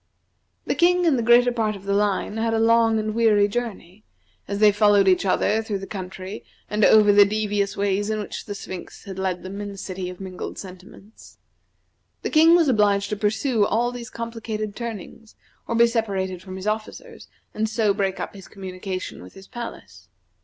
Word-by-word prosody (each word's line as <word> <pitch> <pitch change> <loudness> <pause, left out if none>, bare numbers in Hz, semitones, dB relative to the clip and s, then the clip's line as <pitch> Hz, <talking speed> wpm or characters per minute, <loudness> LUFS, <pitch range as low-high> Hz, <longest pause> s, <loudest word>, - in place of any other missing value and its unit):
The - - 0
King 360 +1 +3
and 290 -7 +3
the - - +1
greater 240 +2 +5
part 220 -3 -1
of 195 - -11
the 200 0 -1
line 205 +1 0
had 225 0 0
a - - +1
long 225 0 +4
and 215 0 -2
weary 215 -3 +4
journey, 210 -3 -5 0.4
as 200 - -3
they 210 0 +6
followed 205 -1 +4
each 190 +1 +3
other 215 +3 +2
through 215 -2 -3
the 195 - -7
country 190 0 -7 0.3
and 210 0 +1
over 210 -1 +6
the 205 0 +8
devious 205 -1 -1
ways 200 +1 0
in 215 0 -1
which 210 - -6
the 205 - -6
Sphinx 185 -2 -9
had 190 -1 -8
led 185 -2 -2
them 195 +2 -6
in 205 - -5
the 200 - -10
City 185 -1 -5
of 180 - -10
Mingled 185 -1 -7
Sentiments. 190 +3 -13 0.9
The - - -2
King 325 +2 +6
was 335 -3 +4
obliged 205 -5 +2
to - - 0
pursue 215 +3 +1
all 230 +4 +1
these 245 -1 -8
complicated 225 -3 -5
turnings, 225 -1 -8 0.3
or 230 - -2
be 235 +1 +6
separated 195 -6 -2
from 185 0 -9
his 190 +1 -7
officers, 220 - -5 0.3
and 220 +1 -1
so 215 -2 +1
break 195 -2 -1
up - - -5
his 195 -2 -12
communication 185 -1 -6
with 90 - -13
his 195 0 -13
palace. 240 -1 -9
210 Hz, 195 wpm, -23 LUFS, 195-225 Hz, 0.9 s, the